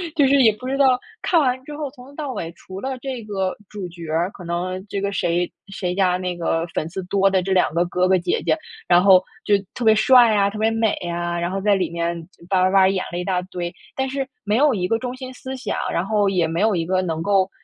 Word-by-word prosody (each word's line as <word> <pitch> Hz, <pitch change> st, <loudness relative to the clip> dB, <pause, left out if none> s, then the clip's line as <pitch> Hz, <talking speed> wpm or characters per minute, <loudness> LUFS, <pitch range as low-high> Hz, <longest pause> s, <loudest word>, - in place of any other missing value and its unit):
就 290 Hz, -3 st, +4 dB
是 275 Hz, +1 st, +5 dB
也 220 Hz, -4 st, +6 dB
不 215 Hz, +5 st, -11 dB
知 270 Hz, +1 st, -1 dB
道， 265 Hz, -2 st, +5 dB, 0.2 s
看 345 Hz, -, +2 dB
完 260 Hz, -3 st, +1 dB
之 295 Hz, -, -7 dB
后 295 Hz, -1 st, -4 dB
从 255 Hz, -1 st, -14 dB
头 280 Hz, -, -15 dB
到 290 Hz, -3 st, -4 dB
尾 165 Hz, -, -4 dB
除 185 Hz, +2 st, -10 dB
了 260 Hz, +3 st, -4 dB
这 255 Hz, -3 st, -5 dB
个 195 Hz, -3 st, -2 dB, 0.2 s
主 200 Hz, -4 st, -6 dB
角 170 Hz, -2 st, -9 dB
儿， 170 Hz, +4 st, 0 dB
可 180 Hz, -, -11 dB
能 185 Hz, +3 st, -3 dB
这 200 Hz, -, -3 dB
个 200 Hz, 0 st, -1 dB
谁 175 Hz, -2 st, 0 dB, 0.2 s
谁 190 Hz, -2 st, -3 dB
家 185 Hz, -1 st, +2 dB
那 180 Hz, -1 st, -4 dB
个 165 Hz, -1 st, 0 dB
粉 155 Hz, -, -2 dB
丝 190 Hz, +2 st, -5 dB
多 195 Hz, 0 st, +3 dB
的 190 Hz, -1 st, +2 dB
这 190 Hz, -, -3 dB
2 185 Hz, -4 st, +2 dB
个 170 Hz, +1 st, +2 dB
哥 180 Hz, +1 st, +1 dB
哥 190 Hz, -, +4 dB
姐 180 Hz, -, -1 dB
姐， -, -, +2 dB, 0.3 s
然 175 Hz, 0 st, +5 dB
后 190 Hz, -2 st, +7 dB, 0.2 s
就 205 Hz, -, +3 dB, 0.2 s
特 245 Hz, -, -5 dB
别 220 Hz, -, +6 dB
帅 235 Hz, +1 st, +6 dB
啊、 200 Hz, 0 st, +3 dB
特 210 Hz, -, -8 dB
别 220 Hz, +1 st, +2 dB
美 225 Hz, -2 st, +1 dB, 0.2 s
啊， 175 Hz, 0 st, -2 dB
然 170 Hz, +1 st, -2 dB
后 195 Hz, -, -2 dB
在 205 Hz, 0 st, +3 dB
里 190 Hz, -, -1 dB
面 170 Hz, 0 st, -2 dB, 0.3 s
吧 185 Hz, -2 st, +3 dB
吧 185 Hz, -, +3 dB
吧 190 Hz, -1 st, +5 dB
演 190 Hz, -1 st, 0 dB
了 175 Hz, -, -4 dB
一 180 Hz, -, -2 dB
大 185 Hz, -2 st, 0 dB
堆。 180 Hz, -2 st, -5 dB, 0.2 s
但 265 Hz, 0 st, -1 dB
是， 270 Hz, 0 st, -2 dB, 0.2 s
没 210 Hz, -, +1 dB
有 290 Hz, -1 st, +4 dB
一 180 Hz, -3 st, -1 dB
个 225 Hz, -, +1 dB
中 250 Hz, +1 st, -5 dB
心 255 Hz, 0 st, -8 dB
思 260 Hz, +1 st, -7 dB
想， 260 Hz, -, -3 dB
然 170 Hz, -, -1 dB
后 205 Hz, -1 st, +2 dB
也 180 Hz, -4 st, +1 dB
没 165 Hz, +4 st, -2 dB
有 220 Hz, -1 st, +3 dB
一 165 Hz, -2 st, -1 dB
个 185 Hz, +1 st, +1 dB
能 165 Hz, -3 st, -2 dB
够， 195 Hz, 0 st, +2 dB
195 Hz, 280 characters per minute, -22 LUFS, 180-230 Hz, 0.3 s, 后